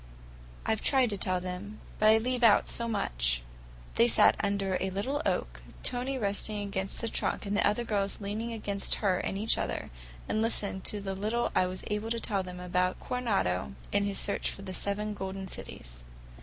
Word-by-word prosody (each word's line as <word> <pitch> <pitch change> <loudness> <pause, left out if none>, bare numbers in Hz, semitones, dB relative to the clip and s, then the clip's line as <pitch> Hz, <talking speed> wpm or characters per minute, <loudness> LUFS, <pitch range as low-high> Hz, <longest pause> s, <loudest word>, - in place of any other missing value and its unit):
I've 220 - +1
tried 260 -4 +4
to 200 - -1
tell 185 0 +1
them, 185 +4 -6 0.2
but 215 - +6
I 220 - +8
leave 250 +2 0
out 215 -3 +6
so 235 - 0
much." - - 0 0.5
They 120 - +6
sat 115 - +6
under 200 -2 0
a 190 - 0
little 255 +10 -1
oak, - - -1 0.2
Tony 255 +2 0
resting 205 -1 0
against 195 -1 -1
the 230 - -1
trunk 225 - -1
and 200 0 -1
the - - +4
other 210 +4 +1
girls 200 -3 -1
leaning 215 +3 -3
against 205 -3 -2
her 185 -2 +3
and 195 - -2
each 220 +3 +1
other, - - -3 0.4
and 215 - +1
listened 205 -4 0
to 210 - -2
the 195 -1 -3
little 215 +5 0
I 185 - +3
was 185 0 -6
able 210 +1 -2
to 230 0 +1
tell 200 -4 0
them 180 -1 -7
about 180 +1 0
Coronado 140 - -1 0.2
and 200 0 +3
his 200 - -1
search 200 - 0
for 195 - -7
the 190 -1 -5
Seven 210 +3 -1
Golden 190 -1 -5
Cities. - - -7
200 Hz, 195 wpm, -30 LUFS, 190-220 Hz, 0.5 s, I